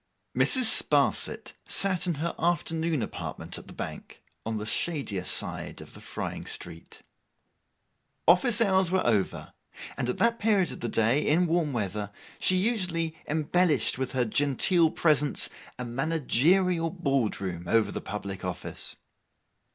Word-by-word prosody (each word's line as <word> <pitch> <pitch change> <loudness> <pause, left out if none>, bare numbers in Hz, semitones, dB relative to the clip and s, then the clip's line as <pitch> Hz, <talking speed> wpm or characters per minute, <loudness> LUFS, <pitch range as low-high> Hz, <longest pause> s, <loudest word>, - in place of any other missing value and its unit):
Mrs. 260 -2 +4
Sparsit 220 - +3
sat 185 -3 +1
in 175 - 0
her 165 +4 -3
afternoon 165 -4 0
apartment - - -6
at - - -15
the - - -11
Bank, - - -8 0.2
on 110 -1 -2
the 105 - -5
shadier 120 - -2
side - - -2
of - - -12
the - - -11
frying - - -6
street. 85 -1 -6 1.2
Office 210 +7 +4
hours 190 -4 +3
were 185 +1 0
over: 105 -5 -1 0.4
and 125 -2 -2
at - - -2
that 230 0 +2
period 205 -4 +2
of - - -8
the 120 - -3
day, 115 +8 +1
in 165 +5 +3
warm 165 -3 0
weather, 105 -3 -3 0.3
she 185 - +3
usually 180 -6 0
embellished 160 -1 +1
with 130 - -3
her 125 -2 +1
genteel 145 - +2
presence, 150 -3 +2 0.3
a 125 - -5
managerial 165 +6 +1
board 140 - -1
room 90 -3 -5
over 110 +1 +2
the - - -5
public 100 -2 -6
office. 90 -1 -2
155 Hz, 145 wpm, -27 LUFS, 115-180 Hz, 1.2 s, Mrs